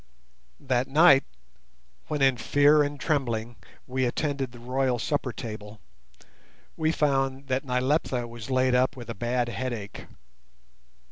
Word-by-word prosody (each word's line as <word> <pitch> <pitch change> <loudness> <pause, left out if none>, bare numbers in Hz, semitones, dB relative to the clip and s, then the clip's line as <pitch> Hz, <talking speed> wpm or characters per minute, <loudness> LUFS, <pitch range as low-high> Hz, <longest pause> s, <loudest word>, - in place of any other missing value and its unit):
That 130 -1 0
night, 145 -1 +6 0.8
when 150 -2 -1
in 135 -1 +5
fear 145 +4 +4
and 145 0 -2
trembling 120 -7 -1 0.3
we 130 0 -1
attended 135 0 -2
the 120 - -13
royal 125 +1 -1
supper 135 +2 -2
table, 105 -3 -8 1.0
we 160 0 +1
found 135 -3 0
that 130 +2 0
Nyleptha 125 -1 0
was 115 0 -9
laid 130 -1 +2
up 130 +2 +2
with 120 -2 -7
a - - -4
bad 120 +2 -1
headache. 120 -5 -5
130 Hz, 130 wpm, -26 LUFS, 120-140 Hz, 1.0 s, night